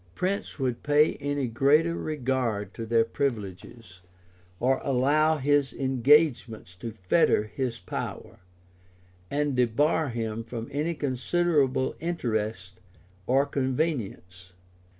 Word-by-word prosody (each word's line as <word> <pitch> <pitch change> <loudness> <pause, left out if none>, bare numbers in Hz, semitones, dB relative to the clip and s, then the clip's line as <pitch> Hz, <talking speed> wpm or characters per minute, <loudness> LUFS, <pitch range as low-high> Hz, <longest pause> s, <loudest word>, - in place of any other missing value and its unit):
Prince 195 +2 -2
would 130 -4 -2
pay 150 +1 +3
any 145 -1 -2
greater 145 +8 +3
regard 125 - -2
to 115 - -6
their 115 0 +4
privileges, 105 -6 -5 0.6
or 130 +2 +1
allow 145 +4 +2
his 145 -2 +1
engagements 130 - +2
to 115 +6 -7
fetter 105 - +2
his 115 +3 -4
power, 90 - -6 0.9
and 145 -1 0
debar 145 +6 +2
him 115 -1 -3
from 115 0 -6
any 155 +4 -1
considerable 140 -1 0
interest 110 - -3 0.5
or 135 +3 +3
convenience. 125 - -3
130 Hz, 105 wpm, -27 LUFS, 115-145 Hz, 0.9 s, their